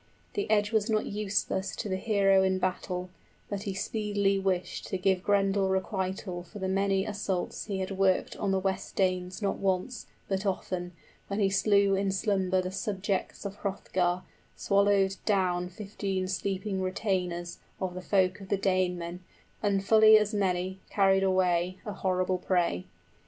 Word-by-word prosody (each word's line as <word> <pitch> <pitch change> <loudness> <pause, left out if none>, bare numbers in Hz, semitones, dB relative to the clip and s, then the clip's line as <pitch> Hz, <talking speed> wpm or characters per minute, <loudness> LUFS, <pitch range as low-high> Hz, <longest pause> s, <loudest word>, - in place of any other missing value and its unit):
The 405 - -2
edge 210 -1 +3
was 220 0 +1
not 215 -1 +1
useless 200 -2 -1
20 - - -3
To 210 - -5
the 190 - 0
hero 195 -3 +4
in 190 0 +2
battle, 180 0 -2 0.4
but 200 -1 -3
he 190 - -3
speedily 205 -1 0
wished 185 -2 -2
to 190 - -2
Give 185 0 +2
Grendel 195 -1 +2
requital 190 -1 -2
for 180 +4 -12
the 190 -2 -2
many 195 0 +1
assaults 200 -3 -3
he 195 -3 -3
Had 190 - -3
worked 190 -1 +1
on 200 - -1
the 190 - +2
West 190 0 -3
Danes 185 +1 0
not 200 - 0
once, 195 +6 -1 0.2
but 195 0 -1
often, 180 -2 -2 0.3
When 200 +1 -2
he 195 -2 +2
slew 200 0 +3
in 195 0 +1
slumber 190 -2 +1
the 185 - -4
subjects 195 -1 -2
of 200 0 -5
Hrothgar, 185 -2 -1 0.3
Swallowed 200 -1 +2
down 180 -3 +1
fifteen 195 -1 -3
sleeping 190 +1 -2
retainers 180 -2 -2 0.2
25 - - -28
Of 180 - -9
the 180 0 -9
folk 190 0 +2
of 190 - -10
the 200 - +2
Danemen, 180 -2 0 0.4
and 195 -2 +1
fully 220 0 +8
as 210 0 0
many 190 -2 0
Carried 195 -1 +3
away, 185 -1 +2
a 210 - -4
horrible 185 -1 0
prey. 175 - 0
190 Hz, 165 wpm, -29 LUFS, 185-200 Hz, 0.4 s, fully